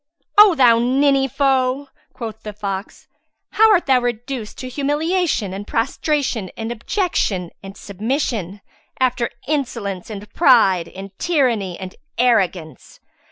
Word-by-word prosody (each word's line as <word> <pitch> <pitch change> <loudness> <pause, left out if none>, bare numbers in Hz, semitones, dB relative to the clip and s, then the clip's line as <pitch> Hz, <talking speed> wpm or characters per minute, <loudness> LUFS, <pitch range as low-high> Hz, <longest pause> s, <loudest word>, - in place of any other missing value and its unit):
"O 415 -4 +8
thou 240 -5 +5
ninny 270 +2 +2
foe," 270 0 0 0.2
quoth 225 -3 -7
the 210 -1 -7
fox, 200 -1 -6 0.4
"how 445 0 +5
art 365 -4 +3
thou 260 -2 +3
reduced 245 -1 -4
to 255 - -6
humiliation 290 - -1
and 200 +2 -7
prostration 255 - -1
and 225 +1 -4
abjection 225 - -1
and 195 0 -10
submission, 210 - -3 0.4
after 250 -2 +1 0.2
insolence 230 -11 -3
and 210 -1 -7
pride 220 - +4
and 195 +2 -10
tyranny 240 - 0
and 185 -1 -8 0.2
arrogance! 185 - 0
240 Hz, 120 wpm, -20 LUFS, 200-275 Hz, 0.4 s, O